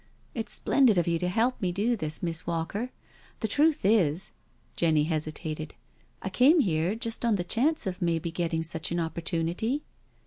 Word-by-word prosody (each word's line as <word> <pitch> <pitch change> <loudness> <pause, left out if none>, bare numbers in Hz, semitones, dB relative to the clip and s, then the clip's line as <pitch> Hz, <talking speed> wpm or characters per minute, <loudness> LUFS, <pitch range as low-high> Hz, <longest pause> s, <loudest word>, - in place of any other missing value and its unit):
It's 225 -3 -3
splendid 255 -8 +3
of 175 - +2
you 170 -1 +1
to 180 - -1
help 230 +7 +1
me 180 -2 0
do 215 +7 +1
this, 155 -5 -3
Miss 165 -1 -3
Walker. 170 +8 -2 0.5
The 220 - 0
truth 295 +3 +2
is 190 -5 +3
" - - -38
— - - -37
Jenny 155 -3 +3
hesitated 155 0 -3 0.2
— - - -36
I - - -2
came 265 - +5
here 175 - 0
just 230 0 -4
on 230 -3 +3
the 180 - -1
chance 260 - +1
of 190 0 -4
maybe 170 -1 0
getting 165 -1 -1
such 160 +1 -1
an 175 - 0
opportunity.' 170 - -1
175 Hz, 185 wpm, -28 LUFS, 165-225 Hz, 0.5 s, came